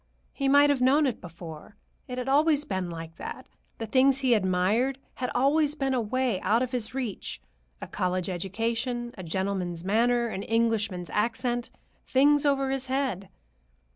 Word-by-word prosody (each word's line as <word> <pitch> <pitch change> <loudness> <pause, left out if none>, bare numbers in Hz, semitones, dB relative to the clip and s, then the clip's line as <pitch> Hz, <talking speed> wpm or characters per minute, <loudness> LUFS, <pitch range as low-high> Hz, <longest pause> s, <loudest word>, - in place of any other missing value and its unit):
He 275 - -1
might 285 +1 +6
have 275 -3 0
known 280 +4 +4
it 255 -5 -2
before. 170 +1 -10 0.3
It 250 - -6
had 250 +1 -3
always 295 +1 +3
been 190 -3 -3
like 165 -1 -8
that; - - -7 0.3
the 225 - -4
things 260 +4 +4
he 260 -3 +2
admired 210 +6 +1 0.2
had 250 -1 -3
always 290 +4 +3
been 270 -3 -1
away 245 -2 0
out 230 +4 +2
of 255 - -4
his 250 -1 -4
reach: 245 -7 -4 0.4
a - - -6
college 185 -1 -1
education, 230 +6 -2
a 190 - -8
gentleman's 180 -1 -2
manner, 235 +5 +2
an 195 -4 -4
Englishman's 220 -5 0
accent—things 255 +5 0
over 275 -1 +1
his 270 -1 -2
head. 260 -8 -2
240 Hz, 155 wpm, -27 LUFS, 190-265 Hz, 0.4 s, might